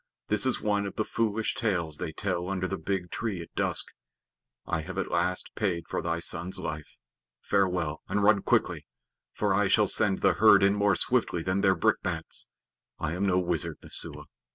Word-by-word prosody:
This 105 Hz, +3 st, +3 dB
is 130 Hz, -, 0 dB
one 105 Hz, -1 st, 0 dB
of -, -, -8 dB
the 110 Hz, -, -1 dB
foolish 110 Hz, -1 st, -1 dB
tales 85 Hz, -9 st, -1 dB
they -, -, -4 dB
tell 90 Hz, 0 st, -2 dB
under 95 Hz, -1 st, -1 dB
the -, -, -3 dB
big 90 Hz, +1 st, -3 dB
tree 110 Hz, -6 st, -3 dB
at 85 Hz, -, -10 dB
dusk. -, -, 0 dB, 0.8 s
I 80 Hz, -, -1 dB
have 95 Hz, +3 st, -8 dB
at 95 Hz, -, -2 dB
least 85 Hz, +1 st, -1 dB
paid 90 Hz, -6 st, -1 dB
for -, -, -2 dB
thy 85 Hz, +1 st, -2 dB
son's 85 Hz, +3 st, -2 dB
life. 75 Hz, -4 st, -6 dB, 0.4 s
Farewell; 90 Hz, -5 st, 0 dB
and 100 Hz, +1 st, 0 dB
run 100 Hz, -1 st, +5 dB
quickly, -, -, 0 dB, 0.4 s
for 105 Hz, -2 st, 0 dB
I 105 Hz, +1 st, +2 dB
shall 105 Hz, +2 st, +4 dB
send 100 Hz, -1 st, +2 dB
the -, -, +4 dB
herd -, -, +6 dB
in 100 Hz, 0 st, +5 dB
more 100 Hz, -1 st, +2 dB
swiftly 85 Hz, -1 st, 0 dB
than 95 Hz, +2 st, 0 dB
their 95 Hz, -1 st, +4 dB
brickbats. 80 Hz, -, -1 dB, 0.5 s
I 80 Hz, 0 st, -3 dB
am 95 Hz, +3 st, -1 dB
no 90 Hz, -1 st, +2 dB
wizard, 85 Hz, -3 st, -1 dB
Messua. -, -, -1 dB
95 Hz, 185 wpm, -28 LUFS, 85-100 Hz, 0.8 s, herd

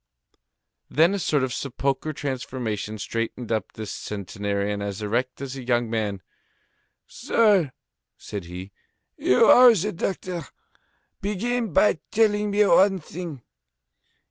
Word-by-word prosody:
Then 165 Hz, +6 st, +4 dB
a 200 Hz, -, -1 dB
sort 150 Hz, -5 st, +1 dB
of 130 Hz, -2 st, -2 dB
sepulchral 140 Hz, +3 st, -2 dB
transformation 125 Hz, -6 st, -4 dB
straightened 115 Hz, +3 st, -4 dB
up 110 Hz, -3 st, -2 dB
this 110 Hz, -1 st, -6 dB
centenarian 100 Hz, 0 st, -3 dB
as 100 Hz, +1 st, -4 dB
erect 120 Hz, +5 st, -2 dB
as 135 Hz, -1 st, -5 dB
a 135 Hz, -, -6 dB
young 120 Hz, -2 st, 0 dB
man. 105 Hz, -4 st, -2 dB, 0.8 s
"Sir," 200 Hz, -, +2 dB, 0.5 s
said 100 Hz, -4 st, -7 dB
he, 90 Hz, +3 st, -8 dB, 0.4 s
"you 125 Hz, -, +4 dB
are 245 Hz, -2 st, +8 dB
the 210 Hz, +3 st, -1 dB
doctor. 180 Hz, -3 st, -4 dB, 0.7 s
Begin 220 Hz, +3 st, -1 dB
by 170 Hz, +1 st, +3 dB
telling 210 Hz, -1 st, +2 dB
me 205 Hz, +1 st, +3 dB
one 195 Hz, 0 st, +5 dB
thing. 160 Hz, -5 st, -8 dB
130 Hz, 120 wpm, -24 LUFS, -, 0.8 s, are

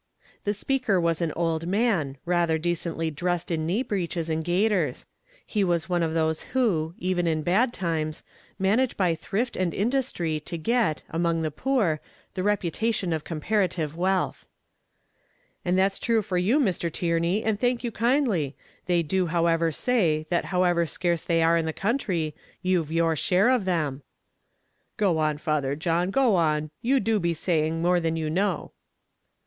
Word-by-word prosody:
The 205 Hz, +1 st, 0 dB
speaker 245 Hz, -3 st, +1 dB
was 170 Hz, -1 st, 0 dB
an 165 Hz, -2 st, 0 dB
old 165 Hz, -1 st, -1 dB
man, 190 Hz, -, +1 dB
rather 170 Hz, -2 st, +2 dB
decently 165 Hz, -1 st, -2 dB
dressed 175 Hz, +3 st, -2 dB
in 160 Hz, -1 st, -1 dB
knee 205 Hz, +9 st, +1 dB
breeches 170 Hz, -6 st, -2 dB
and 160 Hz, 0 st, -1 dB
gaiters; 190 Hz, +4 st, +1 dB, 0.4 s
he 210 Hz, -2 st, 0 dB
was 175 Hz, -2 st, 0 dB
one 175 Hz, -1 st, +1 dB
of 160 Hz, -1 st, -1 dB
those 160 Hz, -1 st, +1 dB, 0.2 s
who, 170 Hz, -10 st, +1 dB
even 180 Hz, -1 st, 0 dB
in 155 Hz, -1 st, 0 dB
bad 220 Hz, -, +2 dB
times, 160 Hz, -7 st, -2 dB, 0.3 s
manage 220 Hz, +7 st, +1 dB
by 180 Hz, -4 st, +2 dB
thrift 210 Hz, +9 st, -2 dB
and 180 Hz, -2 st, -1 dB
industry 205 Hz, -, 0 dB
to 170 Hz, +3 st, -6 dB
get, 220 Hz, -1 st, 0 dB
among 165 Hz, 0 st, 0 dB
the 155 Hz, -, -1 dB
poor, 195 Hz, -, 0 dB, 0.3 s
the 185 Hz, -, -3 dB
reputation 200 Hz, 0 st, 0 dB
of 155 Hz, -2 st, -2 dB
comparative 165 Hz, -2 st, -1 dB
wealth. 185 Hz, +2 st, -1 dB, 1.2 s
"And 180 Hz, +1 st, +1 dB
that's 195 Hz, +1 st, +2 dB
true 225 Hz, -2 st, +1 dB
for 180 Hz, -2 st, -1 dB
you, 220 Hz, +11 st, +3 dB
Mr. 185 Hz, -, 0 dB
Tierney, 170 Hz, +5 st, 0 dB
and 220 Hz, -2 st, 0 dB
thank 245 Hz, 0 st, 0 dB
you 240 Hz, -, -2 dB
kindly; 230 Hz, -, +1 dB, 0.3 s
they 175 Hz, -2 st, +2 dB
do 185 Hz, +3 st, 0 dB
however 165 Hz, -1 st, +2 dB
say, 160 Hz, -, +1 dB
that 175 Hz, -, +1 dB
however 175 Hz, -2 st, +2 dB
scarce 170 Hz, +1 st, -1 dB
they 165 Hz, -1 st, +2 dB
are 165 Hz, +1 st, +4 dB
in 165 Hz, -1 st, 0 dB
the 160 Hz, -, -2 dB
country, 190 Hz, -, -1 dB, 0.3 s
you've 180 Hz, -4 st, +1 dB
your 165 Hz, 0 st, +2 dB
share 190 Hz, -, +3 dB
of 245 Hz, -7 st, +1 dB
them." 155 Hz, -7 st, -1 dB, 1.0 s
"Go 185 Hz, -6 st, +2 dB
on, 155 Hz, -1 st, +1 dB
Father 145 Hz, -3 st, -1 dB
John, 170 Hz, +3 st, 0 dB
go 245 Hz, -1 st, +3 dB
on, 155 Hz, -2 st, +1 dB
you 265 Hz, +3 st, +3 dB
do 225 Hz, -3 st, +1 dB
be 170 Hz, -2 st, 0 dB
saying 160 Hz, 0 st, 0 dB
more 180 Hz, 0 st, +3 dB
than 165 Hz, -1 st, -1 dB
you 155 Hz, -1 st, -2 dB
know." 190 Hz, +2 st, -1 dB
175 Hz, 165 wpm, -26 LUFS, 160-200 Hz, 1.2 s, are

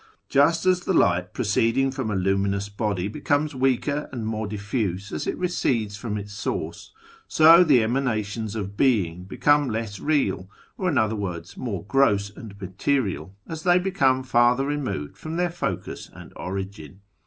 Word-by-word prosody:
Just 165 Hz, +5 st, +3 dB
as 185 Hz, -1 st, +4 dB
the 180 Hz, +1 st, -1 dB
light 90 Hz, -, +2 dB
proceeding 120 Hz, +4 st, +1 dB
from 130 Hz, -4 st, -3 dB
a 105 Hz, -, -1 dB
luminous 100 Hz, +1 st, 0 dB
body 100 Hz, -3 st, -2 dB
becomes 145 Hz, +5 st, 0 dB
weaker 135 Hz, +3 st, 0 dB
and 120 Hz, -4 st, -4 dB
more 110 Hz, -1 st, -2 dB
diffuse 100 Hz, -2 st, -3 dB
as -, -, -4 dB
it -, -, -2 dB
recedes 120 Hz, -, 0 dB
from 105 Hz, 0 st, -4 dB
its 105 Hz, 0 st, -7 dB
source, 100 Hz, -, -4 dB, 0.4 s
so 165 Hz, +3 st, +7 dB
the 135 Hz, -9 st, +4 dB
Emanations 110 Hz, -3 st, -1 dB
of 100 Hz, -2 st, -4 dB
Being 95 Hz, -9 st, +1 dB
become 145 Hz, +7 st, +2 dB
less 110 Hz, -2 st, -4 dB
real, 140 Hz, -11 st, 0 dB, 0.3 s
or, 185 Hz, -, -1 dB
in 145 Hz, -, 0 dB
other 110 Hz, -1 st, +2 dB
words, 90 Hz, -4 st, -5 dB
more 100 Hz, -9 st, -4 dB
gross 100 Hz, -4 st, +2 dB
and 100 Hz, -1 st, -11 dB
material, 100 Hz, 0 st, -2 dB
as 160 Hz, -1 st, -6 dB
they 175 Hz, +2 st, +4 dB
become 140 Hz, -9 st, +2 dB
further 125 Hz, +1 st, +3 dB
removed 140 Hz, -, -3 dB
from 160 Hz, +1 st, -5 dB
their 175 Hz, 0 st, 0 dB
focus 175 Hz, -, -4 dB
and -, -, -13 dB
origin. 95 Hz, -2 st, -6 dB
110 Hz, 160 wpm, -24 LUFS, 100-140 Hz, 0.4 s, so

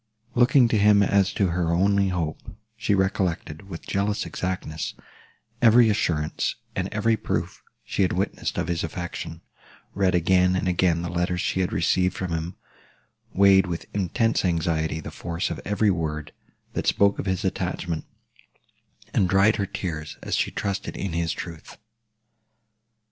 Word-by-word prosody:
Looking 125 Hz, +1 st, +5 dB
to 110 Hz, -, +2 dB
him 100 Hz, 0 st, +6 dB
as 100 Hz, -1 st, +3 dB
to 95 Hz, -3 st, +1 dB
her 85 Hz, -1 st, 0 dB
only 100 Hz, +3 st, +3 dB
hope, 85 Hz, -4 st, -2 dB, 0.3 s
she 110 Hz, -2 st, +1 dB
recollected, 95 Hz, -3 st, -1 dB
with 85 Hz, -3 st, -8 dB
jealous 100 Hz, +1 st, -1 dB
exactness, 90 Hz, -4 st, -4 dB, 0.7 s
every 115 Hz, 0 st, +6 dB
assurance 80 Hz, -7 st, -1 dB, 0.2 s
and -, -, -1 dB
every 115 Hz, 0 st, +2 dB
proof -, -, -3 dB, 0.2 s
she -, -, -2 dB
had 95 Hz, -, +3 dB
witnessed 95 Hz, +3 st, -2 dB
of -, -, -1 dB
his 85 Hz, -1 st, -1 dB
affection; 85 Hz, -1 st, -5 dB, 0.5 s
read 95 Hz, -2 st, +2 dB
again 90 Hz, +1 st, +3 dB
and 95 Hz, -, -1 dB
again 90 Hz, -2 st, +2 dB
the 85 Hz, -, -3 dB
letters 90 Hz, +1 st, -1 dB
she -, -, -1 dB
had 90 Hz, -, 0 dB
received 90 Hz, +3 st, +1 dB
from 95 Hz, -3 st, -3 dB
him; 85 Hz, +2 st, -3 dB, 0.8 s
weighed, 95 Hz, 0 st, +5 dB
with 85 Hz, -2 st, -4 dB
intense 105 Hz, +4 st, +1 dB
anxiety, 80 Hz, -2 st, 0 dB
the -, -, -7 dB
force 85 Hz, 0 st, -3 dB
of -, -, -5 dB
every 105 Hz, 0 st, +2 dB
word, 75 Hz, -3 st, -3 dB, 0.4 s
that -, -, -2 dB
spoke 100 Hz, 0 st, +3 dB
of -, -, -3 dB
his 95 Hz, -1 st, -1 dB
attachment; 85 Hz, -3 st, -2 dB, 1.1 s
and 90 Hz, -, +2 dB
dried 100 Hz, +4 st, +4 dB
her 100 Hz, -2 st, -1 dB
tears, 80 Hz, -6 st, -5 dB
as -, -, -1 dB
she -, -, +1 dB
trusted 100 Hz, -1 st, -3 dB
in 95 Hz, -4 st, -3 dB
his 85 Hz, -1 st, 0 dB
truth. 85 Hz, -3 st, -8 dB
90 Hz, 155 wpm, -25 LUFS, 85-100 Hz, 1.1 s, him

